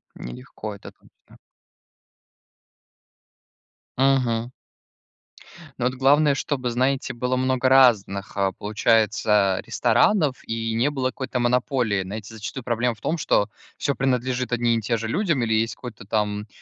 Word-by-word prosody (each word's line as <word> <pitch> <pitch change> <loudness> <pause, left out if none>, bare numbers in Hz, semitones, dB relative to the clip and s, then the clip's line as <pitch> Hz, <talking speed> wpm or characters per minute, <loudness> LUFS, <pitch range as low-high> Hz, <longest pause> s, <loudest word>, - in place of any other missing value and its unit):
Нелегко, 105 - -8
это 100 - -11
точно. - - -24 2.6
Мгм. 125 -3 +2 1.3
Но 120 - 0
вот 130 +1 0
главное, 140 +2 +4
чтобы, 130 -4 -2
знаете, 130 +3 0
было 125 +1 -1
много 130 0 +1
разных, 100 -8 +3
а, 100 -1 +1
получается, 105 -1 +2
ресторанов, 130 - +2
и 115 0 -3
не 120 +6 +2
было 135 -3 -1
какой-то 130 -2 -4
монополии. 120 -4 +1
Знаете, 105 +3 -7
зачастую 115 +4 -7
проблема 120 0 0
в - - -23
том, 170 - -1
что 105 -8 +1 0.3
всё 140 - -1
принадлежит 130 -1 -1
одним 120 -1 +1
и - - -7
тем 115 +2 0
же 110 +1 -4
людям, 170 - 0
или 115 -1 0
есть 110 +1 0
какой-то 120 -6 -9
там, 105 0 -1
120 Hz, 135 wpm, -23 LUFS, 110-130 Hz, 2.6 s, главное